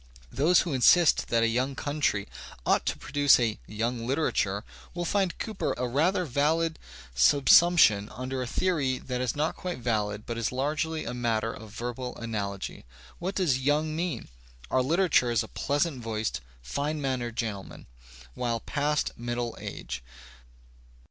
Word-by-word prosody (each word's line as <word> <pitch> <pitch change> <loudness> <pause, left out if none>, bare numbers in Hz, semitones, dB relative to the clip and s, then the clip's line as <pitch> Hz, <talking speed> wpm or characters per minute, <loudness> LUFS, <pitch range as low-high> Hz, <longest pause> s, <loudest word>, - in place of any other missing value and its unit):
Those 160 +6 +4
who 170 - -3
insist 155 +6 +5
that 115 -1 +2
a - - +4
young 130 +4 0
country 145 -9 -1 0.4
ought - - +2
to - - 0
produce 145 -2 +4
a 115 -3 0
"young" 115 +2 -2
literature, 105 -8 0 0.3
will 175 0 -2
find 190 0 0
Cooper 215 -3 -2
a 125 +1 -1
rather 170 +9 +1
valid 160 +4 +1 0.4
subsump 145 - +6
tion 105 -9 +5
under 130 +1 -4
a 125 - -3
theory 145 -5 0
that 125 0 -4
is 125 -2 -1
not 150 +2 0
quite 180 -1 -4
valid 105 -3 -1
but 115 -1 -4
is 115 - -1
largely 155 +4 -1
a 120 - -4
matter 115 -2 -1
of 110 -1 -10
verbal 120 +3 -5
analogy. 100 -4 -4 0.4
What 190 +3 -3
does 155 -9 +2
"young" 150 +3 +1
mean? 170 0 -3 0.4
Our 130 - +3
literature 160 -2 +3
is 115 -3 +2
a - - -8
pleagjajnt 145 -2 -1
voicedyfine 110 - -3
mannered 130 -5 -2
gentleman, 105 -5 -5 0.5
well 115 - -1
past 150 +4 -1
jmddle 120 0 -3
age. - - -6
130 Hz, 150 wpm, -28 LUFS, 115-155 Hz, 0.5 s, subsump